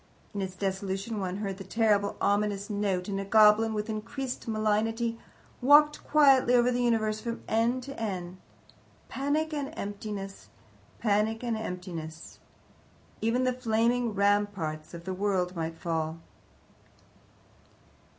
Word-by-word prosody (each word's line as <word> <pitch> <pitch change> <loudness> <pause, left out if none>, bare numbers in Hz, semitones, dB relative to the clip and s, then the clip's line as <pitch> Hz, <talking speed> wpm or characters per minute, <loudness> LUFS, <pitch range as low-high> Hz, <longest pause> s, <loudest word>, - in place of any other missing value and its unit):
In 200 - -3
its 190 -1 -4
dissolution 195 +3 -3
one 185 -1 -3
heard 200 -2 -4
the - - -6
terrible, 205 0 +1
ominous 205 0 0
note, 200 -3 -1
and 195 -1 -2
a - - -2
goblin, 215 +2 +5
with 210 +1 -2
increased 240 +5 -5
malignity, 225 +1 0 0.4
walked 295 +3 +6
quietly 270 -5 +5
over 245 0 +4
the 245 0 0
universe 220 -3 +1
from 235 -1 -5
end 235 +3 +1
to 275 0 -8
end. 185 -4 -4 0.7
Panic 300 +4 -1
and 285 -2 -3
emptiness! 200 -1 -6 0.5
Panic 220 +1 +1
and 235 -2 -1
emptiness! 175 -6 -6 0.8
Even 230 +3 +1
the 255 0 +2
flaming 235 -1 +1
ramparts 200 -6 0
of 170 - -9
the 190 +1 -4
world 185 -2 0
might 165 -1 -3
fall. 160 -1 -2
210 Hz, 130 wpm, -29 LUFS, 195-235 Hz, 0.8 s, walked